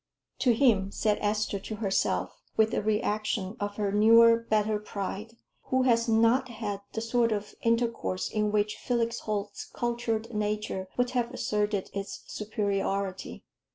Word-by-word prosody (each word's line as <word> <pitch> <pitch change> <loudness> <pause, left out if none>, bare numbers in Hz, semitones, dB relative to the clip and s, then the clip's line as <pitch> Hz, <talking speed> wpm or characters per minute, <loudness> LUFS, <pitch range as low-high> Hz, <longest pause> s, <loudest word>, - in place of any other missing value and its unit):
"To 245 -3 +3
him," 220 -7 +3
said 210 0 0
Esther 210 -1 0
to 215 +3 -6
herself, 210 - -1 0.2
with 220 0 +3
a - - +1
reaction 210 -1 -1
of 205 -1 -3
her 205 -2 -1
newer, 230 +3 +7
better 215 -2 0
pride, 210 +1 -5 0.3
"who 260 0 +1
has 230 -2 +3
not 230 +4 +3
had 210 -4 -4
the 225 - -2
sort 230 0 +1
of 210 -1 -3
intercourse 230 -5 0
in 210 -1 0
which 210 0 0
Felix 235 -1 -1
Holt's 205 -1 -3
cultured 235 -1 -2
nature 210 -2 -2
would 245 0 +1
have 245 -1 0
asserted 210 -5 -1
its 200 0 -5
superiority." 200 -2 -2
215 Hz, 145 wpm, -28 LUFS, 205-230 Hz, 0.3 s, newer